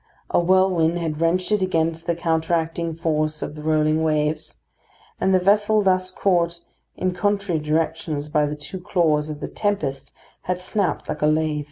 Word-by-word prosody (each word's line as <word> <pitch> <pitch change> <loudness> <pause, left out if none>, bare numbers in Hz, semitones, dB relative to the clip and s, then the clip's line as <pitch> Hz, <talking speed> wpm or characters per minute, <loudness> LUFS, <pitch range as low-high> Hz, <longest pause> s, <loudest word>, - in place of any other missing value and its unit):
A - - +4
whirlwind 175 -2 +3
had 160 -2 -3
wrenched 180 +4 +1
it 210 -2 +2
against 165 -2 0
the 170 - +1
counteracting 165 0 -1
force 155 -2 -1
of - - -5
the 150 - -9
rolling 155 0 +2
waves, 155 -1 0 0.6
and 190 - +2
the 190 - +5
vessel 205 +3 +3
thus 185 -1 +2
caught 175 -3 +1 0.4
in 185 -1 0
contrary 200 -2 0
directions 155 -1 -1
by 150 0 +1
the 150 - -3
two 150 +5 -8
claws 155 -4 +1
of 150 -1 -6
the - - -3
tempest 140 -10 -2 0.4
had 180 0 0
snapped 195 +1 -1
like - - -4
a 150 - +3
lath. 155 0 +1
165 Hz, 170 wpm, -22 LUFS, 155-185 Hz, 0.6 s, the